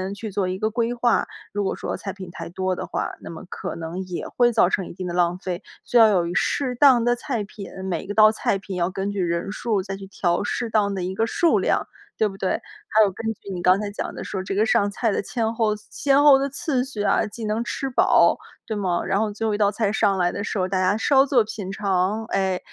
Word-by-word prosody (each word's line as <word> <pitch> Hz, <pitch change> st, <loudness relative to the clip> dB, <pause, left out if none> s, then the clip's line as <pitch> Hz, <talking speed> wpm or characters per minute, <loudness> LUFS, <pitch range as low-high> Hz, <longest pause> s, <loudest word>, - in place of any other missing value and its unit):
去 215 Hz, +2 st, -6 dB
做 195 Hz, -1 st, -1 dB
一 185 Hz, +1 st, -2 dB
个 215 Hz, -, +1 dB
规 230 Hz, +1 st, -1 dB
划。 240 Hz, -1 st, +2 dB, 0.3 s
如 205 Hz, 0 st, -1 dB
果 190 Hz, -, -1 dB
说 -, -, -4 dB
菜 195 Hz, -, -6 dB
品 190 Hz, -2 st, -9 dB
太 170 Hz, -1 st, -7 dB
多 185 Hz, +1 st, -2 dB
的 -, -, -5 dB
话， -, -, -3 dB
那 -, -, -9 dB
么 165 Hz, -, -9 dB
可 -, -, -5 dB
能 165 Hz, +3 st, -5 dB
也 180 Hz, -2 st, -5 dB
会 240 Hz, -1 st, +2 dB
造 215 Hz, -5 st, +4 dB
成 190 Hz, -1 st, -1 dB
一 -, -, -9 dB
定 185 Hz, +1 st, -5 dB
的 175 Hz, -, -4 dB
浪 175 Hz, 0 st, +1 dB
费。 185 Hz, 0 st, -4 dB, 0.2 s
需 245 Hz, -, +2 dB
要 225 Hz, -1 st, +8 dB
有 180 Hz, -5 st, +2 dB
一 -, -, -3 dB
适 255 Hz, +5 st, 0 dB
当 255 Hz, -2 st, +6 dB
的 240 Hz, +1 st, +2 dB
菜 240 Hz, -3 st, -3 dB
品， 200 Hz, -1 st, -9 dB, 0.2 s
每 170 Hz, -3 st, -2 dB
一 -, -, -12 dB
个 205 Hz, -, -3 dB
道 215 Hz, 0 st, +7 dB
菜 215 Hz, -2 st, 0 dB
品 195 Hz, 0 st, -7 dB
要 175 Hz, 0 st, 0 dB
根 195 Hz, +1 st, -3 dB
据 200 Hz, -, -4 dB
人 170 Hz, +2 st, -1 dB
数 210 Hz, -1 st, -1 dB
再 195 Hz, +1 st, -5 dB
去 195 Hz, 0 st, -9 dB
调 175 Hz, -2 st, 0 dB
适 235 Hz, +3 st, -2 dB
当 210 Hz, -2 st, +1 dB
的 190 Hz, -2 st, -3 dB
一 185 Hz, +1 st, -3 dB
个 225 Hz, -, +1 dB
数 335 Hz, +8 st, +2 dB
量， -, -, 0 dB, 0.3 s
对 220 Hz, -, +3 dB
不 195 Hz, -1 st, -8 dB
对？ 190 Hz, -, -1 dB, 0.4 s
还 220 Hz, 0 st, +4 dB
有 200 Hz, -, +2 dB
根 205 Hz, -, -8 dB
据 200 Hz, -, -13 dB
你 180 Hz, -, -4 dB
刚 185 Hz, +2 st, +4 dB
才 210 Hz, -1 st, -3 dB
讲 205 Hz, -, -5 dB
的 -, -, -7 dB
说 190 Hz, -2 st, -4 dB
这 195 Hz, -, -4 dB
个 210 Hz, +2 st, +3 dB
上 205 Hz, -2 st, +2 dB
菜 225 Hz, +2 st, 0 dB
的 -, -, 0 dB
千 225 Hz, +1 st, -2 dB
后 220 Hz, -2 st, +1 dB
先 280 Hz, 0 st, +2 dB
后 290 Hz, -2 st, +8 dB
的 275 Hz, +1 st, -1 dB
次 270 Hz, -2 st, -1 dB
序 260 Hz, -5 st, -6 dB
啊， -, -, +2 dB
既 220 Hz, +2 st, -7 dB
能 215 Hz, +2 st, -1 dB
吃 270 Hz, +2 st, -3 dB
饱， 250 Hz, -, +4 dB, 0.3 s
对 220 Hz, -, -3 dB
吗？ 185 Hz, -4 st, -1 dB
然 195 Hz, +1 st, +1 dB
后 215 Hz, -1 st, 0 dB
最 220 Hz, +2 st, -3 dB
后 215 Hz, -, 0 dB
一 -, -, 0 dB
道 205 Hz, -1 st, +3 dB
菜 210 Hz, -1 st, 0 dB
上 200 Hz, -2 st, +2 dB
来 175 Hz, -1 st, +2 dB
的 200 Hz, -, -4 dB
时 210 Hz, -, -3 dB
候， 185 Hz, -, +1 dB
大 190 Hz, 0 st, -1 dB
家 185 Hz, +3 st, +2 dB
稍 270 Hz, +4 st, +4 dB
作 255 Hz, -4 st, +3 dB
品 205 Hz, -3 st, -6 dB
尝， 195 Hz, +1 st, 0 dB
哎， 190 Hz, -4 st, 0 dB
205 Hz, 290 characters per minute, -23 LUFS, 185-225 Hz, 0.4 s, 要